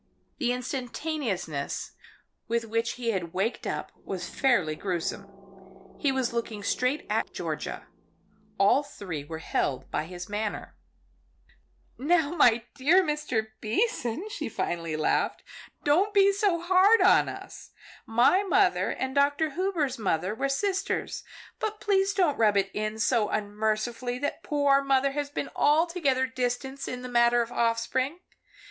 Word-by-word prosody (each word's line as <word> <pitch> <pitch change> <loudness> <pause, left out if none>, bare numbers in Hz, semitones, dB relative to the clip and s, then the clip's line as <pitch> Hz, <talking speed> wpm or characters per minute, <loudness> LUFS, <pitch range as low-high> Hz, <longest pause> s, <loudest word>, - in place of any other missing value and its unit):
The 250 -4 +1
instantaneousness 245 - -3 0.6
with 230 0 0
which 230 +1 -1
he 240 -2 -2
had 175 -5 -3
waked 200 +6 -1
up - - -4
was - - -5
fairly 195 - +1
gruesome. 190 +2 -3 0.7
He 285 - +2
was 260 -3 -1
looking 225 -3 -3
straight 255 +7 0
at - - -1
Georgia; - - -4 0.7
all 200 +8 +4
three 185 - -7
were 160 +2 -7
held 135 -4 -2
by - - -1
his 180 +1 -8
manner. 210 +1 -4 1.2
"Now 315 +2 +2
my 240 -8 +4
dear 305 +8 +4
Mr. 295 -9 -1
Beason," 245 - -1
she - - -4
laughed - - -19
finally, 165 -2 -2 0.9
"don't 365 +8 +3
be 400 0 +6
so 390 -3 +1
hard 375 +6 +5
on - - +5
us. - - -9 0.4
My 240 - +4
mother 400 - +2
and 260 0 -3
Dr. 285 +2 +2
Hubers' 320 -7 -1
mother 185 -1 0
were 275 +5 -1
sisters, 385 +7 -1 0.4
but 430 -1 -3
please 395 -1 +2
don't 350 -7 +2
rub 210 -3 +4
it 195 0 +1
in 215 +1 -2
so 220 -1 +2
unmercifully 215 +4 -1
that 285 +2 -3
poor 285 -2 +3
mother 275 0 +2
has 290 0 -3
been 290 - -4
altogether 300 -4 +2
distanced 260 +2 -3
in 250 0 -5
the - - -5
matter 240 0 +4
of 230 - -10
offspring. 235 +6 0
250 Hz, 140 wpm, -27 LUFS, 215-295 Hz, 1.2 s, be